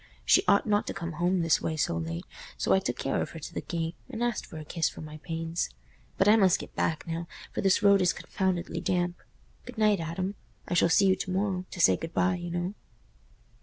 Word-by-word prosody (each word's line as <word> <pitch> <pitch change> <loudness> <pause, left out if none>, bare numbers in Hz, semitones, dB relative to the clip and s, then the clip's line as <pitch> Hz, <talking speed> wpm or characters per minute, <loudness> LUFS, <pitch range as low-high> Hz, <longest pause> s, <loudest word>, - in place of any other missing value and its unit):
She - - +6
ought 200 - +5
not 210 -1 +1
to - - -4
come 170 0 -4
home 175 +3 +1
this 165 -1 +3
way 160 - -2
so 115 - +1
late. 80 +1 -4 0.3
So - - +2
I 190 - +5
took 125 -9 -3
care 135 - -1
of - - -3
her 165 - -8
to 155 - -8
the - - -3
gate, 165 -1 -3 0.2
and 240 -2 -3
asked 240 -2 -1
for 160 - -9
a 155 - -7
kiss 165 +1 0
for - - -10
my 155 0 -8
pains. 165 +1 -3 0.5
But 190 - +3
I 210 - +8
must 190 -4 +5
get - - -9
back 160 +2 -1
now, 165 0 -4 0.2
for - - -2
this 195 +2 +3
road 200 -1 +6
is 180 - +4
confoundedly 185 -2 -2
damp. 175 -1 0 0.5
Good 245 -1 -10
night, 210 -3 +3
Adam. 170 +4 -3 0.3
I - - -2
shall 170 -1 +4
see 195 +4 +5
you 190 -1 +5
to - - -4
morrow—to 185 -1 -2
say 95 - +5
good 165 - -7
bye, 180 -1 +3
you 175 -1 -4
know." 175 +2 -2
175 Hz, 235 wpm, -28 LUFS, 165-190 Hz, 0.5 s, I